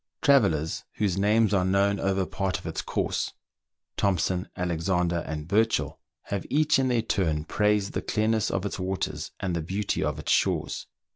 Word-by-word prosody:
Travellers 95 - +3
whose 100 -4 0
names 105 +1 +3
are 95 -2 +3
known 100 +2 +2
over 95 -1 +1
part 95 0 -2
of - - -13
its - - -3
course, - - -2 0.6
Thompson, 95 -1 0
Alexander, 90 0 0
and 75 -1 -5
Burchell, 110 +5 +1 0.2
have 100 -1 -3
each 155 0 +3
in 130 - +2
their 120 -3 +1
turn 80 -9 0
praised 105 0 +1
the - - -1
clearness 110 0 +1
of 95 - -2
its 100 - -3
waters, 95 +1 -3
and 90 -2 -2
the 85 - -1
beauty 95 +6 -1
of - - -1
its - - -3
shores. - - +1
95 Hz, 165 wpm, -27 LUFS, 90-105 Hz, 0.6 s, Travellers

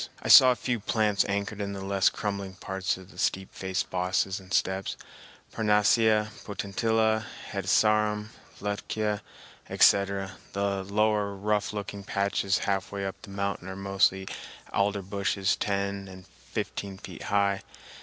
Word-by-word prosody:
I - - -5
saw 130 - +10
a - - +1
few 120 -1 -2
plants 105 -1 +2
anchored 100 +1 -2
in 100 0 -3
the 95 -1 -6
less 95 -1 +3
crumbling 100 -2 -4
parts 95 0 -2
of 95 0 -13
the 90 - -13
steep 95 +2 -1
faced 95 -1 -3
bosses 95 +1 0
and 95 0 -16
steps—parnassia, 105 +3 +1
potentilla, 110 +2 0 0.2
hedysarum, 105 +2 +2 0.3
lutkea, 105 +1 -2 0.5
etc. 100 -1 +3 0.2
The 100 -1 -1
lower, 105 0 +1
rough 105 +1 0
looking 100 -1 -5
patches 100 -1 0
half 95 -2 -1
way 100 -1 -3
up 95 - -5
the - - -11
mountain 100 -2 -3
are 95 - -5
mostly 95 -1 +1 0.5
alder 100 0 +1
bushes 100 0 0
ten 100 -1 -2
or 95 0 -11 0.3
fifteen 100 -1 -4
feet - - -10
high. 100 -1 +1
100 Hz, 135 wpm, -28 LUFS, 95-105 Hz, 0.5 s, saw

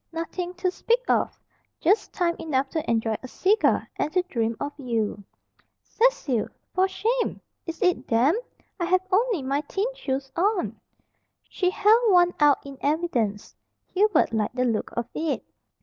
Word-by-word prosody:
"Nothing 345 +2 -4
to 360 +1 0
speak 470 +6 0
of. - - +1 0.4
Just 395 +7 +2
time 340 -2 0
enough 275 -4 0
to 315 0 -3
enjoy 225 -1 +1
a 255 - -8
cigar 400 - +2
and 300 - -1
to 365 -1 +3
dream 230 -10 -2
of 285 +1 -3
you." 225 -5 -2 0.6
"Cecil! 315 - +1 0.3
For 375 +1 +3
shame! 465 +5 -1 0.3
Is 330 0 -5
it 360 -1 +1
damp? 275 - +2 0.4
I 345 - 0
have 370 +1 +2
only 420 - +2
my 275 +2 0
thin 395 +2 0
shoes 270 - -3
on." 385 +2 0 0.7
She 365 - 0
held 430 +4 +4
one 355 -1 +5
out 295 -2 +4
in 275 -1 -9
evidence. 270 -10 -1 0.4
Hubert 380 - +3
liked 220 +2 -1
the 250 0 +1
look 225 -3 -1
of 235 - 0
it. 315 -2 -2
330 Hz, 155 wpm, -25 LUFS, 260-375 Hz, 0.7 s, one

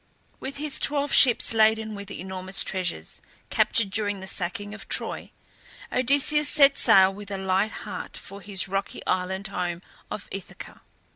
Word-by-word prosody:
With 275 +1 -6
his 295 -1 -3
twelve 285 -1 0
ships 245 -3 +5
laden 220 0 +3
with 200 -1 -8
enormous 190 +1 -3
treasures, 170 - -3 0.3
captured 215 -4 +2
during 205 0 -1
the 190 - -7
sacking 195 +3 -1
of 215 - -10
Troy, - - -1 0.6
Odysseus 285 +3 +3
set 280 -2 +6
sail 190 0 +5
with 205 +1 -10
a 200 - -3
light 190 +3 +1
heart 195 -4 -6
for 200 +1 -10
his 195 0 -1
rocky 195 +1 -4
island 190 +2 -1
home 180 -2 -3 0.3
of 210 - -6
Ithaca. 195 -2 -9
200 Hz, 150 wpm, -26 LUFS, 190-225 Hz, 0.6 s, set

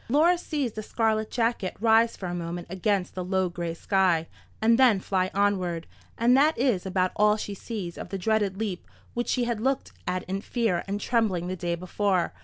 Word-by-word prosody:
Laura 315 +7 +5
sees 300 -7 -2
the 215 - -6
scarlet 220 0 0
jacket 230 -5 -1
rise 225 +1 +4
for 190 - -6
a 175 - -3
moment 175 0 -4
against 190 0 0
the 185 - -4
low 190 0 0
grey 170 -1 -4
sky, 180 -3 +2 0.3
and 230 +2 +4
then 240 -7 +6
fly 185 -1 0
onward, 185 -4 0 0.3
and 240 +2 +4
that 300 +4 +4
is 230 -7 +1
about 185 -1 +1
all 210 0 +4
she 205 -1 -5
sees 195 -4 -6
of - - -7
the 195 - -3
dreaded 205 0 0
leap 205 -4 -4 0.3
which 240 0 -2
she 250 - +1
had 235 -2 -1
looked 270 +2 0 0.2
at 185 0 -1
in 195 +1 -3
fear 220 -7 0
and 200 +1 -2
trembling 210 -8 +1
the 185 - -2
day 175 -1 -2
before. 185 +1 0
200 Hz, 200 wpm, -26 LUFS, 185-230 Hz, 0.3 s, then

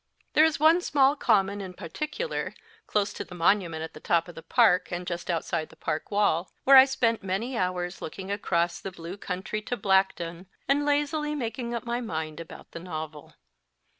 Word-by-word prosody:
There 305 - +6
is 320 -2 +1
one 320 +4 +5
small 280 -4 +3
common 205 -6 +2
in 185 -2 -7
particular, 305 - -4 0.3
close 205 -1 0
to - - -5
the 180 - -11
monu - - -9
< - - -13 0.3
277 - - -9
ment 160 0 -4
at 160 - -7
the - - -10
top 170 +1 +1
of 175 - -9
the 165 - -9
park, 180 +3 +3
and 180 0 -3
just 175 0 -5
outside 165 -1 -1
the - - -16
park 155 -1 -3
wall, 200 -4 +1
where 275 - +7
I 265 0 +11
spent 235 -4 +1
many 200 +7 -2
hours 180 -2 -2
looking 190 +4 -6
across 175 -4 0
the 195 - -6
blue 170 +1 -8
country 195 +2 -4
to 245 +3 -3
Blackdown, 190 -3 +1 0.2
and 290 +2 +2
lazily 295 +1 0
making 240 -2 -3
up 235 - -4
my 240 +1 -1
mind 160 -8 -4
about 165 - -10
the - - -7
novel. 155 -4 -7
195 Hz, 200 wpm, -27 LUFS, 170-245 Hz, 0.3 s, I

